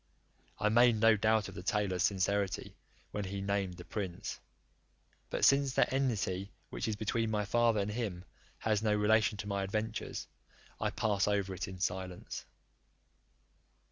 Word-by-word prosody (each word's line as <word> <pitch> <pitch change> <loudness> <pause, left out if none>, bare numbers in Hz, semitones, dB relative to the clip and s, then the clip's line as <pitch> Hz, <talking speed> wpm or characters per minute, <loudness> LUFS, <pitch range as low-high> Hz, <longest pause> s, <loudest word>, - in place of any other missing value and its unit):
I 105 - +2
made 120 +1 +6
no 110 0 +5
doubt 110 0 +2
of - - -9
the - - -7
tailor's 100 -2 0
sincerity, 100 -1 0 0.4
when 105 -1 -3
he 100 +1 -4
named 100 -2 -1
the 90 - -10
prince: 95 -5 -4 0.9
but - - +2
since 140 -1 +4
that - - +3
enmity 100 -8 0 0.2
which - - -3
is 110 - 0
between 110 +2 0
my 105 -1 0
father 115 +1 +3
and 100 +1 -2
him 105 -6 -3 0.3
has 110 -2 +1
no 105 -1 +2
relation 105 0 +3
to 105 - -5
my 100 -1 -1
adventures, 110 +3 -3 0.5
I - - +1
pass 100 -3 +1
it 105 - +3
over 100 -2 0
in 95 -1 -7
silence. 90 0 -3
105 Hz, 155 wpm, -33 LUFS, 95-110 Hz, 0.9 s, made